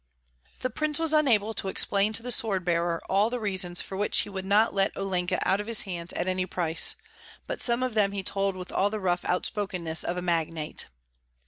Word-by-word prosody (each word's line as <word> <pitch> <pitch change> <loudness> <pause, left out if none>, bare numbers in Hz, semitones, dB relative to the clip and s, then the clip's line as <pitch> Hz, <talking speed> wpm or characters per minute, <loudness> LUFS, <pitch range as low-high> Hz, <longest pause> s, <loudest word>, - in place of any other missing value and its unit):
The 255 - -2
prince 305 +3 0
was 325 -1 +3
unable 225 -8 +3
to 195 - -4
explain 200 +2 +2
to 220 - -1
the 250 - -2
sword 200 -6 +2
bearer 170 -1 0
all 200 +3 +3
the 245 0 -3
reasons 190 -5 0
for 195 - -8
which 205 +2 +2
he - - -6
would 190 -1 -5
not 210 +3 +3
let 195 0 +1
Olenka 185 -2 -1
out 195 +2 +2
of 210 - -9
his 230 -1 +2
hands 175 -3 -4
at - - -2
any 185 0 0
price; 170 -3 +1 0.5
but - - -4
some 240 +1 +2
of 255 -2 -1
them 205 -2 +2
he 200 -1 -4
told 195 0 -1
with 180 0 -8
all 200 - +2
the 215 +1 -4
rough 175 -2 0
outspokenness 180 -3 -1
of 175 - -3
a - - -2
magnate. 165 -3 -1
195 Hz, 215 wpm, -27 LUFS, 180-215 Hz, 0.5 s, was